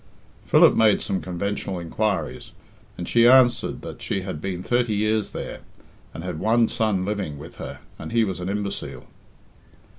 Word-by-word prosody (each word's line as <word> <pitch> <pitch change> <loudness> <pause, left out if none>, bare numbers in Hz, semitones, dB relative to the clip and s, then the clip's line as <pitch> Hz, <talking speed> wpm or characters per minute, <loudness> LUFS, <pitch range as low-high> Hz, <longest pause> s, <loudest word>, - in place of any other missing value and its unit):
Philip - - +6
made 110 -2 +4
some 95 -1 -2
conventional 95 +1 -3
inquiries, 95 +4 -2 0.4
and - - -5
she 120 0 +5
answered 125 -1 +4
that - - -8
she 95 - -2
had 90 -5 -6
been 90 -1 -4
thirty 120 -2 +1
years 110 +1 +1
there, - - -6 0.5
and 80 - -8
had 90 -4 -4
one 115 +3 +3
son 110 -6 0
living 100 -8 -3
with 70 - -11
her, - - -8 0.2
and 80 - -7
he 115 -1 +3
was 95 -4 -3
an 90 +1 -4
imbecile. 100 0 -4
100 Hz, 160 wpm, -24 LUFS, 90-110 Hz, 0.5 s, Philip